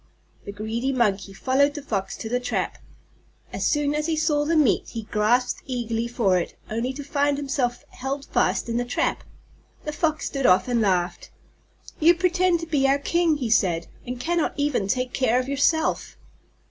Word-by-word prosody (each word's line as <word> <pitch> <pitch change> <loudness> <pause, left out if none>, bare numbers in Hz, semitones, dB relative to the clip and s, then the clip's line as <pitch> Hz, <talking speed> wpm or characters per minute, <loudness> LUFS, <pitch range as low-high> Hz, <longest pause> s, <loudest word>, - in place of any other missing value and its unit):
The - - -5
greedy 220 +5 -2
Monkey 205 -7 0
followed 270 +8 +1
the 295 - -6
Fox 195 -7 -3
to - - -6
the 245 +2 0
trap. 250 - -2 0.7
As - - 0
soon 295 -1 +1
as 300 +1 -1
he 325 - +1
saw 300 -2 +1
the 330 +2 +1
meat 295 -9 +3
he 225 -2 -5
grasped 220 +4 +1
eagerly 235 -2 -2
for 210 -7 +2
it, 170 - -5 0.2
only 230 +4 -1
to 285 +2 -7
find 285 0 +1
himself 270 -4 -2
held 270 +2 -5
fast - - 0
in 230 0 -1
the 245 - +1
trap. 245 - -1 0.6
The 300 - -3
Fox 315 0 0
stood 275 -2 0
off 185 +7 +4
and 240 -2 +1
laughed. 180 -3 0 0.7
"You 335 +3 +6
pretend 365 -1 +2
to - - -4
be 290 -4 +2
our 275 +1 +4
king," 330 +2 +1
he 245 -6 -3
said, 175 -6 +2 0.2
"and 250 0 -6
cannot 335 +3 0
even 285 -9 0
take 255 +4 -1
care 250 -2 +2
of 255 - -3
yourself!" 285 +3 0
260 Hz, 185 wpm, -24 LUFS, 225-295 Hz, 0.7 s, You